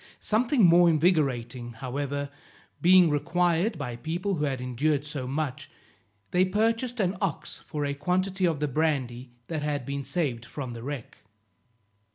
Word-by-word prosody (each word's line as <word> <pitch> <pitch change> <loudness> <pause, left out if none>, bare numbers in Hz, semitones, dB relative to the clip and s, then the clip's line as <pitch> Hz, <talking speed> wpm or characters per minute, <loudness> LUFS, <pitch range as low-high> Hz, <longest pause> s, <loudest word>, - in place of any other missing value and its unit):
Something 230 +1 +3
more 175 0 +6
invigorating, 135 -8 +1
however, 140 +4 -4 0.5
being 180 -2 +6
required 170 +5 +1
by 125 -5 -4
people 170 +10 -2
who 150 -4 0
had 135 -3 -2
endured 140 +4 0
so 145 -4 -4
much, 140 -1 -3 0.6
they 180 - +4
purchased 225 +5 0
an 190 -1 +1
ox 195 -7 -3
for 150 -2 -2
a 140 - -1
quantity 185 +6 0
of 160 -4 -1
the 150 - 0
brandy 130 -4 -1 0.2
that 160 -3 -3
had 145 -3 -2
been 140 +1 -3
saved 135 -4 -2
from 125 +1 -6
the 115 - -7
wreck. 140 -1 -6
150 Hz, 150 wpm, -27 LUFS, 135-180 Hz, 0.6 s, more